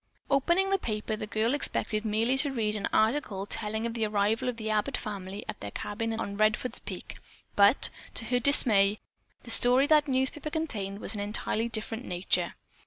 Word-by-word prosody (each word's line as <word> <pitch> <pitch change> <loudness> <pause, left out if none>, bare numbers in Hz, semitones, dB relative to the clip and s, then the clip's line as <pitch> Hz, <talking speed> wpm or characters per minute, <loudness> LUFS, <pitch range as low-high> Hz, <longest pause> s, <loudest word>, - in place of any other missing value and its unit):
Opening 345 +8 +2
the 390 - +2
paper, 215 -3 -3
the 215 - -6
girl 225 +2 0
expected 225 -6 -1
merely 225 +4 +1
to 285 - 0
read 215 -4 -1
an 205 - -2
article 220 -4 0
telling 220 +2 -3
of 235 - -3
the 225 -2 -1
arrival 215 +4 0
of 240 - -5
the 220 -1 -3
Abbott 210 -1 0
family 200 -1 -6
at - - -6
their 100 - -6
cabin 225 - -4
on 200 -2 -4
Redfords 215 +4 +1
Peak, - - -8 0.4
but, 205 +5 +4 0.2
to 230 - 0
her 245 +2 +1
dismay, 215 -6 +4 0.4
the 235 - -5
story 250 +4 +7
that 300 0 +4
newspaper 265 +3 -1
contained 220 - -3
was - - -2
of - - -5
an - - -2
entirely 215 +2 -1
different 225 +1 -2
nature. 180 +1 -1
220 Hz, 185 wpm, -28 LUFS, 210-255 Hz, 0.4 s, story